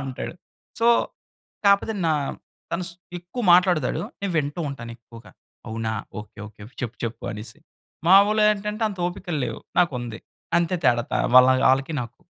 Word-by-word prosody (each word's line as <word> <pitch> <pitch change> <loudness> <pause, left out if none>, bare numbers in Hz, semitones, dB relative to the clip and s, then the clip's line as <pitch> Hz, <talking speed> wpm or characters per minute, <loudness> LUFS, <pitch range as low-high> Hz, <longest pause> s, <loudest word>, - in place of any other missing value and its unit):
అంటాడు. 135 +4 -5 0.5
సో, 230 - +3 0.8
కాపోతే 200 +2 +4
నా 160 - +3 0.6
తను 175 +1 -1 0.3
ఎక్కువ 180 +8 -6
మాట్లాడతాడు. 175 -5 +3 0.2
నేను 200 -2 -1
వింటూ 145 +3 -2
ఉంటాను 115 -3 -7
ఎక్కువగా. 115 0 -15 0.4
అవునా? 110 0 -3 0.3
ఓకే 105 0 -15
ఓకే 105 -1 -16 0.2
చెప్పు 120 -1 -4
చెప్పు 115 0 -5
అనేసి. 105 +7 -8 0.5
మాములేంటంటే, 210 +2 +4
అంత 200 -3 -8
ఓపికలు 175 -4 -4
లేవు - - -6 0.2
నాకు 175 -5 +2
ఉంది. 115 -2 -7 0.4
అంతే 170 +1 0
తేడా 120 -2 +3
త - - +1 0.2
వాళ్ 130 0 +8 0.2
ఆళ్ళకి 135 +4 -1
నాకు. 120 0 -11
150 Hz, 140 wpm, -24 LUFS, 120-190 Hz, 0.8 s, వాళ్